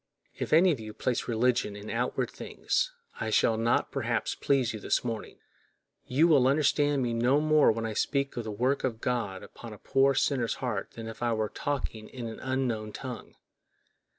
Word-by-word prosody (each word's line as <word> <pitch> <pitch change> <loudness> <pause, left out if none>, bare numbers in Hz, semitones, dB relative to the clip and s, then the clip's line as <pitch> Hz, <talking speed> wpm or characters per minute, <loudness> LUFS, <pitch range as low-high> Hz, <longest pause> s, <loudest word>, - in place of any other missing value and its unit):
If - - -4
any 175 +4 +6
of 145 - -2
you 110 -1 -8
place 125 -2 -1
religion 120 -2 +1
in 105 +1 -7
outward 120 +2 -1
things, - - -1 0.3
I 110 - -2
shall 110 +1 +3
not 115 +1 +1
perhaps - - -1
please 135 -5 +1
you 110 - -5
this - - 0
morning; 115 -3 -5 0.7
you 150 +6 +4
will 140 -6 +5
understand 145 0 +2
me 120 -1 -1
no 125 +5 +3
more 155 0 +5
when 115 +1 -3
I 110 - -3
speak 140 +5 0
of 120 - -3
the 110 - -5
work 125 +7 0
of 115 -4 -1
God 115 -6 -2
upon 115 -2 -10
a - - -10
poor 135 +4 +2
sinner's 135 -4 +1
heart 120 -7 -3
than 115 -1 -7
if 115 - -9
I 120 -1 +1
were 110 -1 -1
talking 125 -6 -4
in 125 -3 -7
an 115 -1 -6
unknown 125 -5 -2
tongue. 130 -2 -7
120 Hz, 190 wpm, -29 LUFS, 110-135 Hz, 0.7 s, any